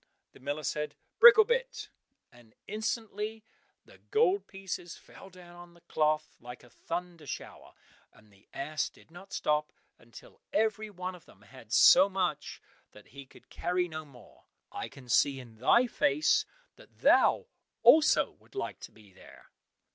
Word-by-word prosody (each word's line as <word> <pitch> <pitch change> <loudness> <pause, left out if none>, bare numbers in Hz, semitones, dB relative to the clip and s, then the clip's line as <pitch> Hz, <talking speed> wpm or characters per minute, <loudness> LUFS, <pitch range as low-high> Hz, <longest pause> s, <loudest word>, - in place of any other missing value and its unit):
The - - -18
miller 145 +3 -4
said, 150 +2 -3 0.2
"Bricklebrit," 475 +2 +5 0.4
and 120 -2 -21
instantly 220 -1 -4 0.4
the - - -19
gold 410 -3 +2
pieces 190 -3 -7
fell 195 - -15
down 180 -2 -15
on 175 0 -14
the 170 - -21
cloth 155 -1 -1
like 125 +1 -11
a 125 - -19
thunder 170 0 -7
shower, - - -9 0.4
and 105 -1 -23
the 95 +1 -25
ass 150 +3 -3
did - - -23
not 190 +3 -14
stop 150 0 -1 0.3
until 120 0 -16
every 215 0 0
one 185 -2 -6
of 180 - -15
them 100 - -20
had 115 +1 -16
so 190 +10 +7
much 180 -6 -3 0.3
that 105 - -17
he 140 0 -12
could - - -20
carry 180 +1 -1
no 155 -2 -7
more. 125 -8 -19 0.3
(I - - -6
can 130 -2 -15
see 135 +3 +2
in 120 -3 -13
thy 235 - +4
face 150 - +1 0.3
that - - -20
thou - - +4 0.4
also 310 -1 +5
wouldst - - -24
like 400 - -5
to - - -11
be 105 -3 -20
there.) - - -18
170 Hz, 155 wpm, -30 LUFS, 135-200 Hz, 0.4 s, so